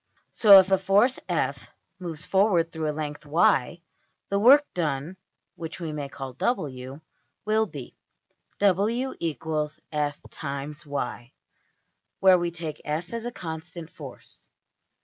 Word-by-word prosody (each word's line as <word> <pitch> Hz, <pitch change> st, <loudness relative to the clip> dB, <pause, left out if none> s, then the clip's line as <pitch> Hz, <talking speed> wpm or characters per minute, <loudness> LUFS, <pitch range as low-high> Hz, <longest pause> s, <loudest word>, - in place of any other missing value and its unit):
So 205 Hz, -3 st, +9 dB
if 190 Hz, 0 st, +2 dB
a 190 Hz, -, +4 dB
force~$f$ 205 Hz, +7 st, +1 dB, 0.3 s
moves 165 Hz, -4 st, -4 dB
forward 190 Hz, -4 st, +2 dB
through 160 Hz, -2 st, -2 dB
a -, -, +1 dB
length~$y$, 150 Hz, +1 st, +1 dB, 0.5 s
the 200 Hz, -, +1 dB
work 275 Hz, +7 st, +7 dB
done 155 Hz, 0 st, -2 dB, 0.4 s
(which 160 Hz, -1 st, -7 dB
we 165 Hz, -3 st, -4 dB
may 145 Hz, -2 st, -5 dB
call~$w$) 135 Hz, -, -3 dB, 0.4 s
will 215 Hz, +1 st, +2 dB
be 140 Hz, -8 st, -9 dB, 0.3 s
\[ -, -, -45 dB
w 205 Hz, +7 st, +2 dB
= 155 Hz, -, -4 dB
f 145 Hz, 0 st, -2 dB
× 145 Hz, +2 st, -6 dB
y; 125 Hz, -3 st, -4 dB, 0.4 s
\] -, -, -51 dB
where 190 Hz, -1 st, +7 dB
we 175 Hz, 0 st, -1 dB
take 165 Hz, -2 st, -6 dB
$f$ 160 Hz, +6 st, -3 dB
as 230 Hz, 0 st, -4 dB
a 240 Hz, -, -3 dB
constant 165 Hz, -3 st, -7 dB
force. 140 Hz, -5 st, -6 dB
160 Hz, 130 wpm, -26 LUFS, 150-190 Hz, 0.5 s, So